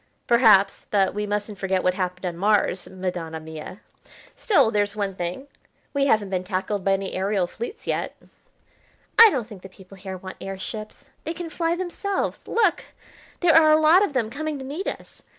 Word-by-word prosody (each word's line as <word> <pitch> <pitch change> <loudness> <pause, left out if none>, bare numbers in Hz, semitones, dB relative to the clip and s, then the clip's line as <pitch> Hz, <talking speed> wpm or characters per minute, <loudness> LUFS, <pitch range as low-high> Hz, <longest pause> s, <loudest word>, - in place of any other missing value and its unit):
"Perhaps, 225 -5 +4
but 195 -2 +2
we 210 +1 -3
mustn't 205 0 -3
forget 190 -1 0
what 185 - +2
happened 180 0 -3
on 175 -2 -3
Mars, 200 0 +1
Madonna 180 -4 -4
mia. 160 +4 -9 0.5
Still, 280 - +3
there's 205 -1 0
one 200 -2 -2
thing, 180 +8 -5 0.5
we 280 -1 +2
haven't 210 -6 +2
been 185 -1 -1
tackled 190 +1 -3
by 195 - +2
any 195 0 -2
aerial 195 0 0
fleets 450 - -8
yet." - - -2 1.0
"I 455 -1 +11
don't 255 - -2
think 210 -4 -12
the 190 - -11
people 190 +1 -15
here 190 0 -7
want 185 +1 -9
air 195 0 -5
ships. 215 +7 -6 0.2
They 325 +2 -4
can 340 -1 -6
fly 335 +1 0
themselves. 370 +2 -3
Look! 420 -6 +1 0.6
there 345 -3 +5
are 315 -1 +7
a 310 - +5
lot 320 +5 +6
of 355 - -1
them 230 -4 -1
coming 310 +2 -4
to 265 - -8
meet 305 +9 -5
us. - - -7
205 Hz, 185 wpm, -24 LUFS, 190-295 Hz, 1.0 s, I